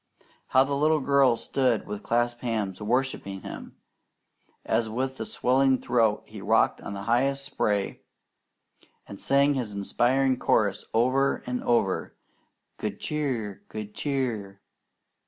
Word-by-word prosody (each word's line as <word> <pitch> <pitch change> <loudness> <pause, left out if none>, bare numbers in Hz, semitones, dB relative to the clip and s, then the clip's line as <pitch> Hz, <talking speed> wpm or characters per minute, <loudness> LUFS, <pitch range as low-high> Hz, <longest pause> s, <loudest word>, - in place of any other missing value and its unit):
How 130 - +5
the 140 +1 -3
little 155 +2 +3
girl 135 -3 +3
stood 125 -4 0
with 105 0 -6
clasped 120 +1 0
hands 105 -5 -2
worshipping 110 -4 -1
him, - - -9 0.9
as 110 0 +1
with 130 +1 -3
swelling 130 +1 +3
throat 115 -4 +1
he - - -10
rocked - - +2
on - - -6
the 100 0 -6
highest 135 +5 +1
spray 100 -2 -1 1.1
and 100 - -9
sang 140 +1 +3
his 120 -7 -3
inspiring 130 +6 +1
chorus 100 -2 +1
over 130 +4 +2
and 125 0 -3
over: 110 -6 0 0.6
"Good - - -4
Cheer! 125 -10 -3
Good 105 -1 -7
Cheer!" 115 -9 -3
120 Hz, 125 wpm, -26 LUFS, 105-135 Hz, 1.1 s, How